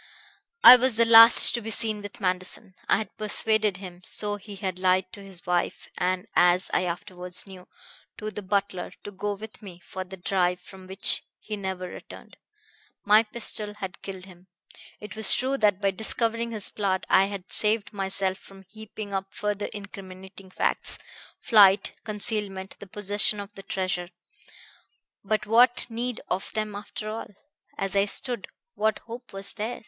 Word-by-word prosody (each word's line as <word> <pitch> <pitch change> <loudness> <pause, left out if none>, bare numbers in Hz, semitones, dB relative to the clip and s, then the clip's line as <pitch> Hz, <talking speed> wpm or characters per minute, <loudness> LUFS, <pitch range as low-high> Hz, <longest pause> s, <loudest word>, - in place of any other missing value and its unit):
"I 250 - +12
was 255 -1 +1
the 230 +1 +4
last 230 0 +9
to 235 - -1
be 225 - -6
seen 215 -1 +2
with 205 0 -9
Manderson. 185 0 -2 0.2
I - - +5
had 220 - -6
persuaded 215 -1 +2
him 180 -2 -10
so 205 +2 +2
he 205 0 -11
had 190 -2 -4
lied 185 0 +2
to 200 - -10
his 190 -3 -9
wife 175 0 -1
and, 180 0 -1
as 180 +1 +3
I 185 - +2
afterwards 180 0 -4
knew, 190 -2 -12 0.5
to 215 0 -5
the 210 0 -6
butler 195 -2 -2
to 205 - -7
go 205 +1 -3
with 215 +2 -11
me 185 -4 -11
for 185 - -6
the 190 +1 -11
drive 180 -1 0
from 190 +1 -14
which 190 +1 +3 0.2
he 215 - -6
never 190 -2 -5
returned. - - -12 0.7
My 210 +2 +6
pistol 215 -2 -4
had 190 -3 -7
killed 190 -2 -8
him. 185 -1 -17 0.5
It 210 +1 -9
was 220 -2 +6
true 265 +2 -1
that 205 -3 +3
by 200 -1 +1
discovering 230 +3 0
his 215 -3 -1
plot 195 -3 -1
I 190 - +5
had 200 -1 -7
saved 215 0 0
myself 190 -1 -1
from 195 0 -16
heaping 215 -1 -9
up 195 0 -3
further 210 0 -2
incriminating 190 -1 -10
facts - - -1 0.4
flight, 200 -3 +5
concealment, 205 -3 -2
the 200 - -10
possession 205 +1 0
of 200 +1 -8
the 195 - -10
treasure. 185 -2 -3 1.1
But 215 +1 -1
what 240 +3 +4
need 240 +1 -3
of 185 +2 -3
them, 215 -1 -3
after 210 +1 -7
all? 220 +1 -5 0.5
As 195 0 -2
I 200 0 +4
stood, 235 +1 -2 0.3
what 220 0 0
hope 240 +2 -10
was 195 0 -3
there? 225 +3 -4
200 Hz, 170 wpm, -26 LUFS, 190-215 Hz, 1.1 s, I